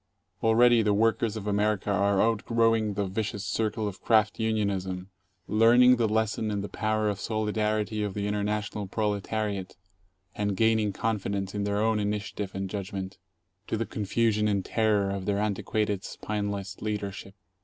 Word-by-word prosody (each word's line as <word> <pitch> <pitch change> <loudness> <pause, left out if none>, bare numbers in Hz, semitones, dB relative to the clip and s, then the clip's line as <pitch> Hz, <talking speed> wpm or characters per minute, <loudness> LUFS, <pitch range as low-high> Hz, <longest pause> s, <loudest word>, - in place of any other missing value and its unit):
Already 115 +1 +5
the 105 -2 +2
workers 115 0 +1
of 105 - -6
America 105 0 0
are 100 0 +2
outgrowing 115 -1 +2
the 100 0 0
vicious 100 +1 -3
circle 110 +2 -1
of 95 -2 -7
craft 110 -1 +3
unionism, 100 -4 -1 0.4
learning 120 +3 +6
the 115 -1 +2
lesson 110 0 0
and 100 -1 -2
the - - -3
power 110 -1 0
of 100 -1 -1
solidarity 110 -1 -1
of 105 -2 -3
the 100 -1 -2
international 105 0 -2
proletariat, 105 -1 -2 0.6
and 105 -2 -2
gaining 110 -1 +3
confidence 100 -2 -2
in 100 -1 -2
their 100 0 0
own 110 +1 +2
initia 105 +1 -2
tive 100 -2 -5
and 95 0 -2
judgment, 95 -1 -5 0.5
to - - -1
the 115 - -1
confusion 105 +1 0
and 100 -3 0
terror 105 -3 +1
of 100 -1 -4
their 100 -1 +1
antiquated, 105 -1 -1
spineless 100 -2 -4
leadership. 100 -2 -4
105 Hz, 155 wpm, -27 LUFS, 100-110 Hz, 0.6 s, learning